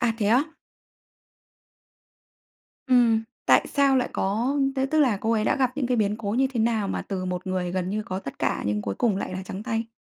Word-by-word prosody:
À, 240 -1 +2
thế 210 - 0
á? 245 +5 +5 2.4
Ừm. 240 -4 +4 0.2
Tại - - +5
sao 275 -2 +3
lại 255 - +1
có 230 +9 0 0.2
thế 265 0 +1
tức 310 +3 +1
là 250 -8 +3
cô 220 +3 -1
ấy 215 -2 +1
đã 275 - +2
gặp 260 -2 +2
những 275 -4 0
cái 250 0 +1
biến 210 -2 +1
cố 215 -2 -4
như 255 +5 +2
thế 235 - -1
nào 220 -3 +1
mà - - -2
từ 190 -2 -4
một 180 0 -4
người 185 -1 -2
gần 185 0 -2
như 215 +2 -2
có 190 -2 -4
tất 140 -8 -8
cả - - -1
nhưng 105 0 -1
cuối 100 -1 -3
cùng 215 - +1
lại 195 - -4
là 185 +1 -4
trắng 190 +2 -7
tay? 225 -1 -2
220 Hz, 230 wpm, -25 LUFS, 190-250 Hz, 2.4 s, á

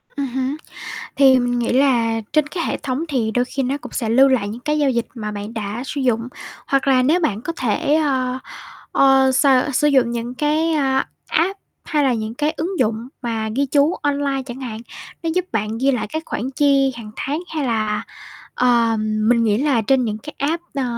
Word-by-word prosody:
Ừm 280 -1 -1
hứm. 265 +3 -2 0.6
Thì 265 -2 +6
mình 245 0 0
nghĩ 240 0 0
là 235 -4 +2
trên 305 -1 +3
cái 335 +2 -3
hệ - - -1
thống 275 +4 -2
thì 240 -6 0
đôi 245 +3 +1
khi 270 +1 -3
nó 265 +3 -1
cũng - - -10
sẽ 230 -5 -2
lưu 265 +4 +6
lại 235 -6 +1
những 230 +4 -6
cái 300 +2 -1
giao 285 -2 +3
dịch 235 -2 -1
mà 210 -2 -4
bạn 205 +3 -6
đã 215 +2 -4
sử 285 - -3
dụng. 240 -2 0 0.4
Hoặc 275 0 +1
là 255 -1 +4
nếu 320 +7 +3
bạn 220 - 0
có 335 - -3
thể, 255 +5 +1
ơ, 260 -4 +1 0.5
ờ, 270 -1 +5
s 260 - +2 0.3
sử 295 +3 +3
dụng 260 -4 +3
những 240 +1 -4
cái, 310 +3 +1
a, 270 -3 +1 0.2
app 380 +5 0 0.3
hay 300 -3 +1
là 260 -2 +3
những 220 0 -3
cái 300 +2 0
ứng 355 +1 -3
dụng 230 0 0
mà 225 -3 -2
ghi 280 +2 +2
chú 285 +5 +3
online 280 -2 0
chẳng 250 +1 -8
hạn, 225 -4 -5 0.4
nó 330 - 0
giúp 365 0 +1
bạn 220 0 -2
ghi 270 +3 +2
lại 245 -4 -1
các 315 +1 -4
khoản 245 +5 -3
chi 275 -2 +3
hàng 215 -2 -9
tháng. 290 +3 -2 0.2
Hay 300 - 0
là, 215 -3 0 0.5
ờ, 235 -2 +3
mình 215 +2 +2
nghĩ 210 -1 +2
là 270 -4 +2
trên 255 +3 +2
những 215 -1 -2
cái 300 +8 -10
app, 325 +5 -1
ờ, 275 - -1
260 Hz, 215 wpm, -20 LUFS, 230-285 Hz, 0.6 s, Thì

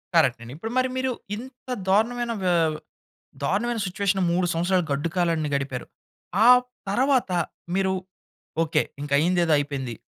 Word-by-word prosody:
Correct 140 -8 +4
అండి. 120 +2 -9
ఇప్పుడు 225 +7 -5
మరి 255 0 +2
మీరు, 260 0 0 0.2
ఇంత 250 +2 -11 0.2
దారుణమైన 235 +4 +2
వ - - +1 1.0
దారుణమైన 235 +4 0
సిట్యుయేషన్ 195 +1 0
3 180 +1 +2
సంవత్సరాలు 175 +2 +1
గడ్డు 145 +4 0
కాలాన్ని 165 -4 +1
గడిపారు. 135 -3 -3 0.6
ఆ - - +7 0.4
తర్వాత 255 +2 +2 0.4
మీరు, 190 0 +2 0.7
ఓకే, 155 -1 +2 0.2
ఇంకా 145 -1 -5
అయిందేదో 170 +1 +2
అయిపోయింది. 135 -4 -3
180 Hz, 130 wpm, -25 LUFS, 155-225 Hz, 1.0 s, ఆ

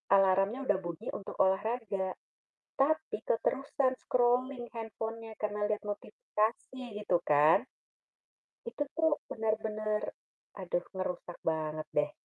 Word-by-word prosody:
alarmnya 195 +6 +4
udah 200 -4 +3
bunyi 170 -2 -6
untuk 195 - -6
olahraga. 195 -1 0 0.6
Tapi 310 -1 +2
keterusan 270 +2 +1
scrolling 245 0 +2
handphone-nya 225 0 -5
karena 210 0 0
liat 210 0 0
notifikasi 220 - -2
gitu 205 -4 +2
kan. 150 +2 +5 1.0
Itu 295 -11 -1
tuh 320 -2 +3 0.2
benar-benar, 215 -1 -1 0.5
aduh - - -1
ngerusak 180 -2 -4
banget 155 -1 -1
deh. 150 0 +3
215 Hz, 105 wpm, -32 LUFS, 190-245 Hz, 1.0 s, kan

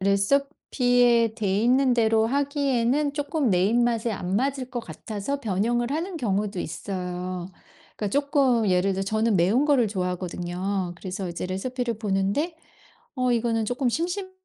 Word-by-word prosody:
레시피에 240 +2 +2
돼 200 -4 0
있는 255 +1 +4
대로 225 -1 +3
하기에는 280 0 +1
쪼끔 290 -3 0
내 180 0 +3
입맛에 235 +1 +1
안 185 -2 -3
맞을 260 +2 -1
것 245 -3 -3
같아서 215 - -5
변형을 235 +3 0
하는 340 +4 -3
경우도 205 - -1
있어요. 180 0 -4 0.5
그러니까 210 - -2
쪼끔 270 -7 +2
예를 185 +2 +2
들어 190 +1 -2
저는 215 0 +1
매운 200 +11 +3
거를 275 -6 +3
좋아하거든요. 180 0 -3
그래서 190 +1 -5
이제 170 +1 -4
레시피를 235 +5 -3
보는데 210 - -1 0.6
어 255 -1 +1
이거는 230 -2 +1
쪼끔 245 +2 0
심심 355 - -2
230 Hz, 330 characters per minute, -25 LUFS, 195-260 Hz, 0.6 s, 있는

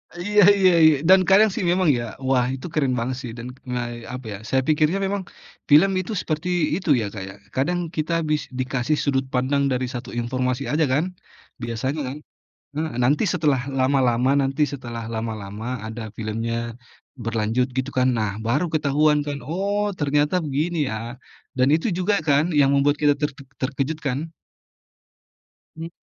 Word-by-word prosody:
Iya 205 +4 +3
iya 190 -2 +5
iya, 155 -1 +7
dan 190 0 +8
kadang 210 +3 +6
sih 190 - -3
memang 180 -2 +2
ya. 120 -3 0 0.2
Wah, 125 -2 +3
itu 130 - -9
keren 140 -5 +1
banget 125 +2 -2
sih, 125 -3 -6
dan, 120 +1 -7 0.2
eee, 120 -1 -4
apa 125 -1 -7
ya, - - -6
saya 130 - +2
pikirnya 155 +2 +3
memang 195 0 -2 0.5
film 155 +7 +6
itu 185 +3 -4
seperti 155 +3 -3 0.3
itu 185 -1 -4
ya - - -2
Kak 100 -3 -6
ya, - - -9 0.2
kadang 165 +7 +1 0.2
kita 155 +2 -1 0.2
bis 150 -1 +1 0.2
dikasih 130 +3 0
sudut 135 -2 +1
pandang 135 +2 +1
dari 130 0 0
satu 125 0 -6
informasi 125 +2 -1
aja 155 +1 +2
kan, 145 +4 +2 0.6
biasanya 120 +6 -2
kan. 135 +3 -5 0.6
Heeh, 160 0 -2
nanti 140 +5 +3
setelah 150 -6 +2 0.2
lama-lama 130 -2 +2
nanti 135 +2 0
setelah 120 -4 -6
lama-lama 110 -1 -5 0.2
ada 110 +1 -6
filmnya, 115 +1 -3 0.7
berlanjut 115 +2 0
gitu 130 +1 -1
kan, 130 0 +4
nah 110 -2 0 0.2
baru 140 +9 +1
ketahuan 150 0 +3
kan, 145 -1 -3
oh 200 +6 -1
ternyata 145 +2 +1
begini 155 +5 -1
ya, - - -3 0.6
dan 130 +1 +4
itu 160 - 0
juga 195 +3 +2
kan 145 +1 +4
yang 140 -2 +4
membuat 140 +1 +3
kita 145 -1 +5
ter 150 0 0 0.3
terkejut 135 +3 -1
kan? 130 -1 0 1.6
Mmm. 165 +1 -7
140 Hz, 165 wpm, -23 LUFS, 125-155 Hz, 1.6 s, dan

